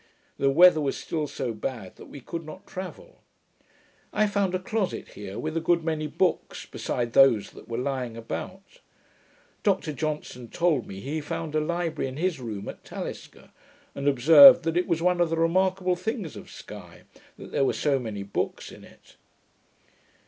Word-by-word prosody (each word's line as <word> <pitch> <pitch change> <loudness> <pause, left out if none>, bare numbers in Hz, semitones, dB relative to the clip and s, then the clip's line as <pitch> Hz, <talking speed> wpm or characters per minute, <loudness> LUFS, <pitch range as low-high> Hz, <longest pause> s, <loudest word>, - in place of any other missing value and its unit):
The 135 - +3
weather 165 +2 +6
was 140 -2 -1
still 155 -2 -3
so 120 -3 -4
bad 110 -3 -6
that - - -12
we 145 - -11
could 165 +6 -6
not 155 +5 -11
travel. 185 -1 -9 0.9
I 215 - +2
found 200 -3 0
a - - 0
closet 215 0 -3
here, 100 -1 -8
with 155 +1 -4
a - - +2
good 170 0 +2
many 155 -2 -2
books, 180 +4 -1
beside 120 -1 -3
those 130 -7 +5
that - - -14
were 115 -1 -4
lying 125 -3 -3
about. 185 - -7 0.8
Dr 190 -6 0
Johnson 150 -5 -4
told 165 -9 +1
me, 95 0 -8
he 150 +6 -3
found 150 +1 -5
a 155 - +2
library 165 -2 -2
in 130 - -9
his 175 -2 -1
room 110 -5 -6
at - - -8
Talisker; - - -8 0.4
and 140 +1 -4
observed, 165 - +9
that 165 +1 -1
it 180 - +1
was 165 -1 0
one 180 0 +2
of 170 - +2
the 165 - -1
remarkable 185 +2 +2
things 195 - -4
of - - -10
Sky, - - -11 0.3
that - - -11
there - - +1
were 135 - +2
so 140 -3 +1
many 110 -5 -5
books 100 - -4
in - - -13
it. - - -19
155 Hz, 180 wpm, -26 LUFS, 130-180 Hz, 0.9 s, observed